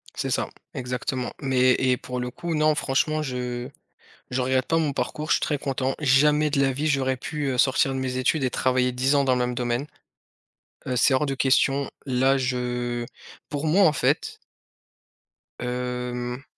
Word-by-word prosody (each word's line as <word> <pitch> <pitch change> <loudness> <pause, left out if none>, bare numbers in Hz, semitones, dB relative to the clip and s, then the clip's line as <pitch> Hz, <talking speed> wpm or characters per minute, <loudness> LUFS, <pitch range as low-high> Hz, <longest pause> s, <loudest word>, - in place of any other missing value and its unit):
C'est - - -2
ça, - - 0 0.2
exactement, 125 0 -3
mais 130 -2 +3
et 130 -1 +2
pour 125 0 -5
le 125 0 -3
coup, 170 +1 -4
non, 155 0 +3
franchement, 155 +2 0
je 125 -2 -4 0.6
je 125 - -1
regrette 130 0 +1
pas 165 - +2
mon 150 -3 0
parcours, 150 +3 -3
je - - +6
suis - - +1
très 150 - -1
content, 135 -1 -1
jamais 150 +2 +4
de 140 -1 +1
la 135 -1 +3
vie, 145 +4 -2
j'aurais 130 -2 +1
pu, 150 +3 -4
heu, 125 - -2
sortir 135 +1 +3
de 130 - -2
mes 130 -1 -2
études 135 +3 +1
et 130 - +1
travailler 125 0 +1
10 130 +3 +1
ans 140 -1 +3
dans 130 - +3
le - - 0
même 125 0 0
domaine, 120 +3 -1 1.0
heu, 125 - -1
c'est 125 +2 +4
hors 130 +3 +2
de 135 -1 -2
question, 135 +1 +2 0.2
là, 135 +1 +2
je 125 -2 -2 0.4
pour 145 +1 -3
moi, 175 +6 +4
en 155 - +4
fait - - 0 1.2
hem 125 +1 -3
130 Hz, 185 wpm, -25 LUFS, 125-140 Hz, 1.2 s, je